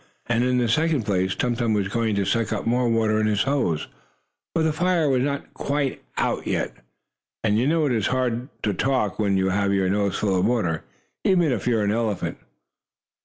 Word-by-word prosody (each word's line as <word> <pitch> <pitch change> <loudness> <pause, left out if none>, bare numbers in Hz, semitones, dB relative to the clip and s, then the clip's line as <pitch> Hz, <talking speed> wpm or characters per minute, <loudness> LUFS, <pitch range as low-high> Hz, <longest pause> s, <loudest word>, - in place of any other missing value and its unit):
And, 120 0 +1
in 125 0 +2
the 120 -1 +2
second 155 +2 +2
place, 95 -2 0
Tum 120 -1 0
Tum 115 -3 0
was 100 -2 0
going 110 +1 0
to 100 -1 0
suck 115 +1 0
up - - -2
more 120 +1 +2
water 110 -1 +2
in 110 - +2
his 105 +1 +1
nose, 135 - 0 0.7
for 165 - +2
the 160 -1 +1
fire 175 -1 +1
was 130 -2 +2
not 140 +1 -3
quite 140 -1 -2 0.2
out - - -1
yet. - - -1 0.7
And 105 -1 +2
you 125 - +1
know 160 0 +2
it 140 - +1
is 110 -4 +1
hard 125 0 -1
to 105 - +1
talk 120 -1 0
when 100 -2 +2
you 95 0 +1
have 100 +1 +1
your 95 -1 +1
nose 100 0 0
full 95 -3 +1
of - - +2
water, 100 -10 0 0.4
even 175 -6 +3
if 125 - -2
you 120 -2 +3
are 105 - +1
an 100 - +1
elephant. 110 -4 -2
115 Hz, 215 wpm, -24 LUFS, 100-130 Hz, 0.7 s, even